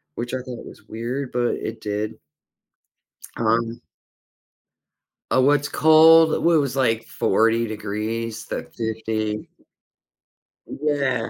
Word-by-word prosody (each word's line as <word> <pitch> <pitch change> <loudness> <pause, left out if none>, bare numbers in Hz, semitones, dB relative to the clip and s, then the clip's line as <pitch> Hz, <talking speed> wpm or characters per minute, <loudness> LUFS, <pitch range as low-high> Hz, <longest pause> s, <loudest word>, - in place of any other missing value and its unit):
which 120 +1 -5
I - - 0
thought 125 -1 -8
was - - -13
weird, 125 +4 -4
but 120 -1 0
it 115 - -6
did. 105 +1 -3 1.2
Um 115 +1 0 1.5
Oh, - - +4
what's 145 +2 +3
cold? 160 +1 +6
When 170 -1 +4
it - - +4
was, 140 -3 -2
like, 115 -4 +1
40 115 +3 +1
degrees 110 +1 -4
to - - -4
50. 110 -1 -3 1.2
Yeah, 140 -5 -1
115 Hz, 110 wpm, -22 LUFS, 110-140 Hz, 1.5 s, cold